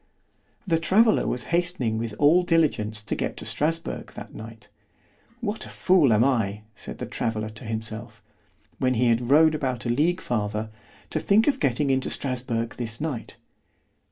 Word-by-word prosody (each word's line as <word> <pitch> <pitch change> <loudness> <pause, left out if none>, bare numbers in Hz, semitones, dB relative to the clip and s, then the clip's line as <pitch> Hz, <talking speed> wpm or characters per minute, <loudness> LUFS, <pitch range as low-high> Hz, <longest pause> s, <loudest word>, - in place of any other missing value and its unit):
The 165 -4 +2
traveller 215 +7 +4
was 125 - -1
hastening 170 -11 0
with 115 -2 -4
all 155 +5 +5
diligence 145 -12 +1
to 100 - -3
get - - -3
to - - -7
Strasburg 165 +2 -2
that - - -9
night. 110 0 -10 0.7
What 220 -1 -2
a - - -9
fool 175 -9 +3
am 110 +1 +4
I, 110 -6 0
said - - -8
the - - -4
traveller 110 -1 -2
to 110 +3 -11
himself, 110 0 -5 0.6
when 130 -1 +2
he 120 +1 +3
had 120 +1 +1
rode 155 +2 +6
about 130 -5 -2
a - - -1
league 160 +9 +2
farther, 110 - -2 0.4
to - - 0
think 215 +3 +3
of 275 -2 +1
getting 135 - +1
into 130 0 0
Strasburg 125 -3 -2
this 115 -2 -4
night. 150 -7 -4
125 Hz, 165 wpm, -25 LUFS, 110-160 Hz, 0.7 s, rode